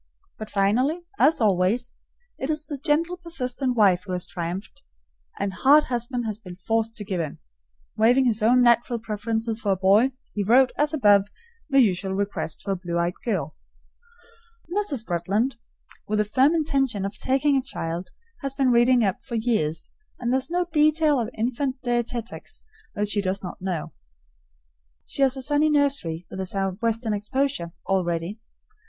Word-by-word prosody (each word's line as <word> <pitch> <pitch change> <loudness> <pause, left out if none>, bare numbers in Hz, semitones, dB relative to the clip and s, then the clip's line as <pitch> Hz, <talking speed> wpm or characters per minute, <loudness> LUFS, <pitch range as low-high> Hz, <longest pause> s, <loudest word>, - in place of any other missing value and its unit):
But 215 -1 -6
finally, 245 - +1 0.2
as 305 +4 +4
always, 210 +3 +1 0.5
it 265 - -3
is 305 0 -1
the 290 -3 -6
gentle, 330 +5 0
persistent 260 -7 -2
wife 185 -4 +4
who 185 - -3
has 180 -1 -3
triumphed, 175 +2 -6 0.6
and 200 -1 -2
hard 285 +9 +5
husband 240 0 -2
has 215 -1 -3
been 180 -5 -10
forced 225 +3 -1
to 210 - -7
give 190 -4 -2
in. 155 -3 -5 0.6
Waiving 245 +4 +4
his 225 -3 +1
own 245 +3 +5
natural 240 0 +3
preference 225 0 -3
for 210 -3 0
a - - 0
boy, 200 +7 +4 0.2
he 210 - -2
wrote, 250 +6 +4
as 295 0 +1
above, 205 -9 +4 0.4
the 275 -1 +5
usual 190 -3 +1
request 195 -5 -2
for 200 - -2
a - - +1
blue 175 -2 -4
eyed 170 +1 0
girl. 190 -9 -2 1.2
Mrs. 295 - -1
Bretland, 200 +9 -1 0.5
with 215 - 0
the 210 - +2
firm 265 +9 +3
intention 270 -10 0
of 200 - -6
taking 275 +2 +2
a 270 - +3
child, 175 -8 -5 0.3
has 275 -1 -4
been 265 -2 +2
reading 240 0 +4
up 195 -3 0
for 240 - -6
years, 220 -9 -1 0.3
and 245 0 -1
there 265 - +3
is 265 - -5
no 355 +1 0
detail 305 -1 +3
of 230 -2 -2
infant 255 +4 -1
dietetics 240 -1 -3 0.3
that 210 0 0
she 210 0 +1
does 195 0 -2
not 180 - -7
know. 180 -5 -3 1.1
She - - -4
has 270 -1 +4
a 265 - -1
sunny 295 +3 +3
nursery, 275 - +1
with 190 - -5
a 190 - -4
southwestern 215 +4 -1
exposure, 210 -4 -2
all 190 -1 +1
ready. 170 +4 -3
225 Hz, 170 wpm, -24 LUFS, 195-265 Hz, 1.2 s, hard